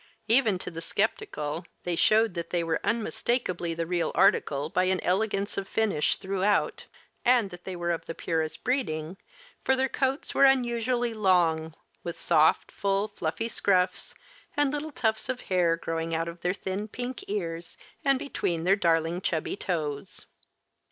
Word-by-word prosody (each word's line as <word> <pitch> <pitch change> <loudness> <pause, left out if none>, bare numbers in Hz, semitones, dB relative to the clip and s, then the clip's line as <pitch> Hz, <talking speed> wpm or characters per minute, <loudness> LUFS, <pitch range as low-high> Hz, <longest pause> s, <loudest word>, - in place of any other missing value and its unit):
Even 225 -4 +4
to 180 - -6
the 165 -1 -6
skeptical, 165 - -2 0.2
they 175 -1 -1
showed 220 +4 +4
that 170 -1 -4
they 175 -1 0
were 165 -1 0
unmistakably 215 -6 -1
the 165 0 -2
real 175 0 0
article 150 -6 +3
by 185 +3 +1
an 185 0 +1
elegance 200 +1 0
of 195 - -6
finish 205 -10 +1
throughout, 195 +1 0 0.4
and 240 -5 +4
that 175 0 -11
they 190 - -4
were 175 0 -1
of 165 - -3
the 165 - -5
purest 160 -2 -2
breeding, 180 - -1 0.5
for 265 - +3
their 265 0 +1
coats 265 +2 -1
were - - +4
unusually 240 -2 +3
long, 170 -6 +2 0.3
with 170 -1 -5
soft, 155 +1 +3
full, 200 +1 0
fluffy 205 +3 -3
scruffs 185 -5 +1 0.4
and 290 -1 +2
little 300 +1 -3
tufts 220 -5 -1
of 255 -1 -2
hair 175 -3 +2
growing 165 0 -2
out 165 +1 -1
of 170 0 -8
their 180 +2 0
thin 195 +2 -4
pink 245 +3 -5
ears 170 -4 -4 0.3
and 275 -1 +4
between 180 - -2
their 190 +3 +4
darling 170 -2 +1
chubby 160 -4 -1
toes. 155 -8 -4
185 Hz, 160 wpm, -28 LUFS, 165-225 Hz, 0.5 s, Even